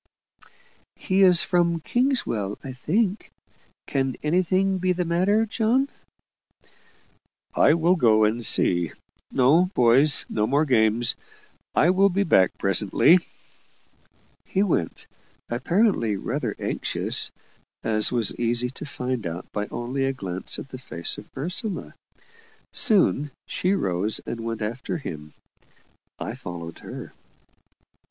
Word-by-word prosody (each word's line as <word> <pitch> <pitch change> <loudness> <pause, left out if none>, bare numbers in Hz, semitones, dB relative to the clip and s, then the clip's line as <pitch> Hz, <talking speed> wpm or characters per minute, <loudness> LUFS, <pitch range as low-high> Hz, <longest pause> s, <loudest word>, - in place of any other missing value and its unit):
"He 190 0 0
is 180 -3 +6
from 170 -2 +1
Kingswell, 165 - -1
I 135 - -6
think. 190 - -1 0.6
Can 135 -2 -1
anything 185 +4 +1
be 185 0 +1
the 180 0 -2
matter, 190 +6 +2
John?" 235 +5 +1 1.6
"I 150 - +4
will 170 +2 +3
go 110 -9 +4
and 110 +3 +1
see. 85 -6 +3 0.4
No, 145 +8 +4
boys, 130 +5 +4
no 105 0 -1
more 145 +5 +2
games 115 -3 +2 0.6
I 175 - +4
will 195 +2 +4
be 200 +2 0
back 95 - +3
presently." 105 - +3 1.2
He 195 - 0
went, 160 - -2 0.5
apparently 130 - +1
rather 95 - -3
anxious - - -1 0.5
as 110 -1 +1
was 115 -5 +1
easy 120 +1 0
to 140 - -8
find 125 -6 -4
out 85 +2 -6
by 105 0 -3
only 125 +3 -3
a 135 - 0
glance 95 -7 -4
at 135 - -8
the 130 - -9
face 85 -9 -2
of - - -14
Ursula. 180 - -4 0.8
Soon 175 -8 +4 0.2
she 185 +1 -1
rose 100 - 0
and 115 - -5
went 115 -1 -4
after 120 +10 -4
him. 75 - -8 0.8
I - - -5
followed 85 -2 -8
her. - - -9
135 Hz, 120 wpm, -24 LUFS, 110-185 Hz, 1.6 s, is